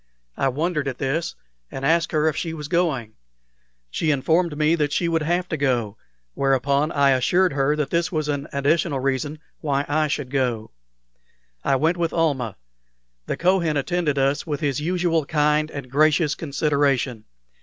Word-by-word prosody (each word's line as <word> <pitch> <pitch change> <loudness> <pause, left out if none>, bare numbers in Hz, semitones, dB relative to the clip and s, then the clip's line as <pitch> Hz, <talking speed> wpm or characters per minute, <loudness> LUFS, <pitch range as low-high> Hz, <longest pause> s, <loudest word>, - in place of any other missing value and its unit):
I 135 - +1
wondered 150 +2 -1
at 130 -2 -3
this, 155 +5 -2 0.3
and 135 - -5
asked 165 +2 +2
her 155 0 +2
if 155 - +1
she 165 0 -3
was 150 -2 -6
going. 150 -10 0 0.8
She 160 - -1
informed 160 +3 +1
me 155 +1 +3
that 150 -3 0
she 170 - 0
would 165 -1 +1
have 175 +3 0
to 160 - -2
go, 120 -7 0 0.4
whereupon 140 +3 +1
I 140 -3 +3
assured 175 +8 +2
her 140 +1 +1
that 150 -2 -2
this 170 +3 0
was 155 -3 -1
an 145 -1 -2
additional 145 +1 +1
reason 135 +3 -1 0.2
why 140 -2 -1
I 155 +1 +1
should 140 -3 -3
go. 125 -5 -1 0.9
I 135 - +2
went 160 +6 +1
with 170 -1 -1
Almah. 140 - 0 0.7
The - - -2
Kohen 170 -4 +2
attended 155 0 0
us 135 +2 +1
with 145 -2 -2
his 145 -3 -1
usual 170 -1 +1
kind 150 +1 +1
and 140 -4 -8
gracious 155 +2 +3
consideration. 140 -6 0
150 Hz, 165 wpm, -23 LUFS, 135-165 Hz, 0.9 s, me